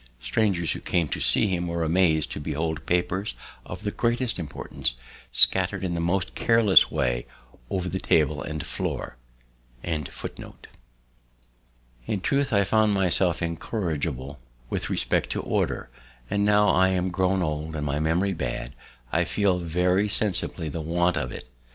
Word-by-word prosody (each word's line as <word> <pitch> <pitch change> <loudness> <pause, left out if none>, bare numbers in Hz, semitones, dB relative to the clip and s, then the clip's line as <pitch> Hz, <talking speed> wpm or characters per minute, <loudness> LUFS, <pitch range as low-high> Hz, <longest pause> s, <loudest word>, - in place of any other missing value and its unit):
"Strangers 85 - +1
who - - -2
came 85 -3 0
to - - -3
see - - +3
him 90 -3 -1
were 85 0 -1
amazed 80 -2 +2
to - - -4
behold 80 +2 -3
papers 95 +3 0 0.3
of - - -7
the 105 - -1
greatest 120 0 +1
importance 75 -6 -3 0.4
scattered 95 +9 +3
in 90 -2 -1
the 85 - -2
most 90 +2 0
careless 115 -4 +5
way - - -1 0.4
over 90 -1 -2
the 95 +1 -2
table 75 -5 +2
and 75 0 -4
floor." - - -4 0.7
In 80 -3 -1 2.2
truth, 140 0 +1
I 100 -2 +4
found 105 +1 +3
myself 90 -2 +1
incorrigible 80 - -3 0.3
with - - -2
respect - - 0
to - - -2
Order; - - -1 0.4
and 100 - +1
now 105 0 +4
I 95 +1 +4
am 90 0 0
grown 95 +1 +1
old, 75 0 -3
and 75 -1 -3
my 70 +1 -1
memory 85 +5 +1
bad, 80 - -4 0.4
I - - +2
feel 100 -3 +1
very 90 +4 +1
sensibly 95 -5 0
the 80 +2 -4
want 85 +3 +1
of 60 - -2
it. - - -8
90 Hz, 150 wpm, -26 LUFS, 80-95 Hz, 2.2 s, careless